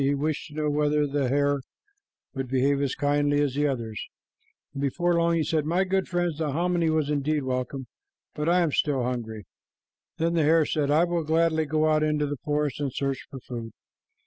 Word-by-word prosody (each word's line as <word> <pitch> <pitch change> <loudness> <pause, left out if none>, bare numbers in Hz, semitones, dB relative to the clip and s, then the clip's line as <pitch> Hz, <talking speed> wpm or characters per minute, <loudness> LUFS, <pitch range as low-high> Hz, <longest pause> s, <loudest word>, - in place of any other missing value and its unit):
He 140 +1 +2
wished 150 +1 -2
to 150 - -13
know 155 -1 0
whether 150 0 +2
the 140 -2 0
hare 140 +1 +2 0.7
would 135 -1 -3
behave 135 +2 +2
as 140 -2 -1
kindly 145 0 +1
as 145 -3 +1
the 145 +2 +1
others, 115 -6 -3 0.7
and 140 - -5
before 175 +6 +1
long 170 0 +2
he 165 - +1
said, 155 0 0
"My 170 +5 +1
good 190 0 0
friends, 175 -3 -1
the 150 -3 -1
hominy 170 +1 +1
was 155 -2 +1
indeed 150 0 0
welcome, 130 +1 -3 0.5
but 150 +2 -1
I 180 +1 +4
am 165 -3 +1
still 140 -3 +1
hungry." 115 -4 -4 0.7
Then 165 +1 +1
the 165 - +2
hare 160 +1 +4
said, 145 -2 0
"I 155 +3 +4
will 175 -1 0
gladly 160 0 +2
go 155 +1 +2
out 155 0 +3
into 150 -1 +1
the 145 0 -3
forest 150 -1 -1
and 140 -2 -1
search 135 +1 -3
for 135 - -8
food." 115 -3 -7
150 Hz, 200 wpm, -26 LUFS, 140-160 Hz, 0.7 s, I